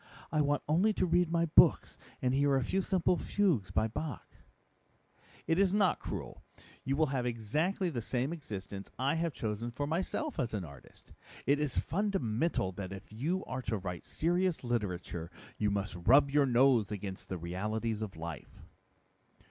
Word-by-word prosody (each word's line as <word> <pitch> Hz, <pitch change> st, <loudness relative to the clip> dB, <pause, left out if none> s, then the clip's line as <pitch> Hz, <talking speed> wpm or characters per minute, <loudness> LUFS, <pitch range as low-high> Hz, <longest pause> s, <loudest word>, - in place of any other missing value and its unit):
I 155 Hz, -, +2 dB
want 145 Hz, 0 st, +1 dB
only 180 Hz, +8 st, +3 dB
to 185 Hz, -, +1 dB
read 175 Hz, -1 st, +3 dB
my 170 Hz, 0 st, +2 dB
books 155 Hz, -, +5 dB, 0.2 s
and 125 Hz, 0 st, +2 dB
hear 140 Hz, 0 st, +3 dB
a 135 Hz, -, +2 dB
few 190 Hz, +10 st, 0 dB
simple 180 Hz, -1 st, +2 dB
fugues 165 Hz, -, +1 dB
by 110 Hz, +4 st, +1 dB
Bach." 140 Hz, +6 st, -6 dB, 1.1 s
"It 165 Hz, +2 st, +2 dB
is 195 Hz, 0 st, +3 dB
not 200 Hz, -3 st, +3 dB
cruel. -, -, -6 dB, 0.4 s
You 135 Hz, +1 st, 0 dB
will 155 Hz, +2 st, +3 dB
have 125 Hz, -2 st, 0 dB
exactly 155 Hz, -, 0 dB
the 120 Hz, -5 st, -3 dB
same 130 Hz, +7 st, -1 dB
existence 100 Hz, -, -7 dB
I 135 Hz, +3 st, +1 dB
have 165 Hz, 0 st, 0 dB
chosen 110 Hz, -2 st, -3 dB
for 130 Hz, +5 st, -3 dB
myself 185 Hz, -, -2 dB
as 120 Hz, -5 st, -1 dB
an 95 Hz, -4 st, -3 dB
artist. 70 Hz, -4 st, -15 dB, 0.3 s
It 140 Hz, +3 st, +3 dB
is 150 Hz, -4 st, -1 dB
fundamental 165 Hz, -, 0 dB
that 95 Hz, 0 st, -6 dB
if 95 Hz, +2 st, -9 dB
you 165 Hz, -, -1 dB
are 130 Hz, 0 st, -4 dB
to 110 Hz, -3 st, -2 dB
write 90 Hz, -3 st, -6 dB
serious 175 Hz, 0 st, 0 dB
literature, 90 Hz, -8 st, -2 dB, 0.3 s
you 105 Hz, -, +2 dB
must 100 Hz, -1 st, -2 dB
rub 135 Hz, +11 st, +5 dB
your 145 Hz, -1 st, +4 dB
nose 120 Hz, -4 st, +4 dB
against 100 Hz, -2 st, -6 dB
the 95 Hz, -, -3 dB
realities 105 Hz, +6 st, -2 dB
of 105 Hz, -5 st, -5 dB
life." 80 Hz, -4 st, -8 dB
130 Hz, 170 wpm, -32 LUFS, 105-165 Hz, 1.1 s, books